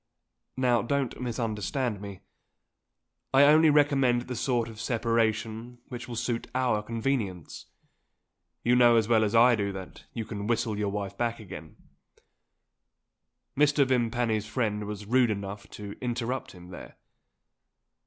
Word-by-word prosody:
Now 125 -3 +3
don't 135 +1 -2
misunderstand 115 -1 -2
me. 100 -2 -8 1.1
I 135 - +8
only 155 +2 +6
recommend 140 -5 +3
the 125 0 -6
sort 120 -1 0
of 115 -1 -9
separation 115 0 -1
which 125 -2 -7
will 120 - -6
suit 115 0 -2
our 125 -5 +1
convenience. 110 - -3 1.0
You 120 +1 +3
know 120 -1 +6
as 110 -2 +3
well 110 -2 +4
as 105 +1 0
I 120 +2 +7
do 100 -2 -2
that 95 -1 -9
you 115 -2 -5
can 105 -2 -5
whistle 115 -2 0
your 105 -1 -1
wife 100 -1 -4
back 120 -1 -1
again 90 -6 -10 0.9
" - - -56
Mr. 145 0 +4
Vimpany's 120 -4 0
friend 105 -3 -1
was 105 0 -6
rude 125 +2 +3
enough 100 -1 -5
to 100 -1 -8
interrupt 125 +1 -3
him, 90 -1 -13
there. 90 - -11
115 Hz, 140 wpm, -28 LUFS, 105-125 Hz, 1.1 s, I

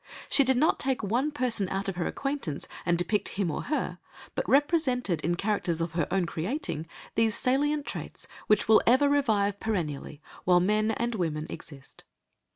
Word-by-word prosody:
She 280 - +6
did 260 -1 +2
not 310 +5 +3
take 265 -4 0
one 240 +9 +1
person 245 -9 0
out 195 +1 -2
of 195 - -2
her 175 - -1
acquaintance 275 - -3 0.2
and 170 -1 +3
depict 190 +4 0
him 190 -5 0
or - - -4
her, 305 - -2 0.3
but - - -3
represented, 265 - +2
in 175 +2 +1
characters 195 -4 -1
of 165 -1 -2
her 165 -2 -1
own 190 -2 +1
creating, 170 - -3 0.3
these 225 -1 +2
salient 290 +3 +1
traits - - -7 0.2
which 210 -1 +3
will 220 0 +7
ever 260 +5 +5
revive 215 -8 +2
perennially 155 -9 -3 0.2
while 180 -1 +5
men 210 +4 +2
and 235 +2 -1
women 160 -7 -2
exist. 135 -3 -10
210 Hz, 170 wpm, -28 LUFS, 175-260 Hz, 0.3 s, will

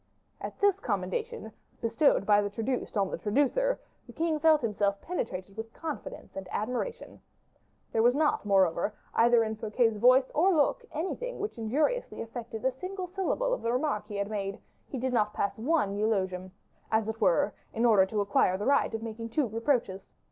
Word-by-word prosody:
At - - -6
this 405 -1 +3
commendation, 470 +2 -3 0.3
bestowed 230 -1 +2
by 205 0 +5
the 205 - -2
traduced 225 +2 -3
on 195 -2 +1
the - - -4
traducer, 290 - +1 0.3
the - - -11
king 320 -1 0
felt 315 -1 +5
himself 205 -3 0
penetrated 195 - -4
with 225 +1 -6
confidence 315 -3 -7
and 195 -1 -6
admiration. 250 - -4 0.7
There 225 - +2
was 240 +2 +4
not, 305 0 +2
moreover, 195 0 +2 0.2
either 235 0 +5
in 220 0 -3
Fouquet's 220 +1 +1
voice 255 +4 +5
or 360 +4 +4
look, 320 - +2
anything 380 +11 -3
which 415 - -4
injuriously 300 - 0
affected 225 -1 -6
a 260 - +3
single 370 +8 -5
syllable 390 +7 -1
of - - -2
the 230 - 0
remark 250 -5 -1
he 210 - -7
had 200 0 -1
made; 200 -2 -3 0.3
he 270 - -4
did 255 +1 -1
not 210 -3 +1
pass 200 +2 -1
one 260 -5 +1
eulogium, 190 -3 -1 0.4
as 220 -1 +2
it 220 +1 -4
were, 195 +1 +3 0.2
in 230 +2 0
order 205 -5 +5
to 210 +1 -1
acquire 195 -2 +2
the 205 - -4
right 280 +1 +3
of 225 - -5
making 230 0 -6
two 265 +3 +1
reproaches. 230 -3 0
230 Hz, 180 wpm, -29 LUFS, 210-305 Hz, 0.7 s, by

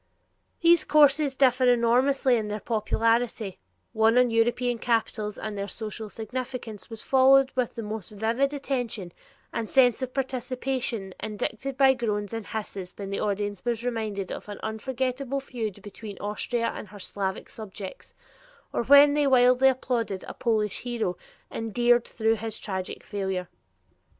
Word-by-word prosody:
These 340 -1 +6
courses 290 -1 +4
differ 255 -1 +4
enormously 250 +2 +3
in 220 -2 -1
their 210 +1 -3
popularity: 225 -1 0 0.3
one 225 +1 +4
on 250 -1 +4
European 240 +1 +1
capitals 220 -3 -1
and 215 -1 -5
their 200 0 -3
social 220 0 -6
significance 230 -2 -6
was 225 -2 -7
followed 270 0 +5
with 250 -3 -1
the 230 - -5
most 215 -1 -5
vivid 230 +6 0
attention 245 -10 -3 0.4
and 225 - -3
sense 250 -3 +4
of 260 -1 -3
participation 255 -5 -2
indicated 220 +5 -4
by 270 -1 +6
groans 210 -5 -2
and 225 -3 -5
hisses 200 -5 -5
when 200 -1 -6
the 200 - -2
audience 205 -1 -2
was 240 -1 -1
reminded 215 -5 -3
of - - -7
an 205 - -7
unforgettable 260 +4 -2
feud 225 -7 -5
between 205 0 -9
Austria 230 +3 -2
and - - -7
her 205 +1 -12
Slavic 190 0 -3
subjects, 205 -5 -9 0.6
or - - +1
when 285 +3 +7
they 295 -1 +2
wildly 255 0 +5
applauded 240 -7 -1
a - - -6
Polish 215 -4 0
hero 235 -7 -2 0.4
endeared 240 +2 +2
through 225 0 +1
his 220 0 -4
tragic 190 -3 -5
failure. 190 -3 -3
230 Hz, 145 wpm, -26 LUFS, 210-255 Hz, 0.6 s, when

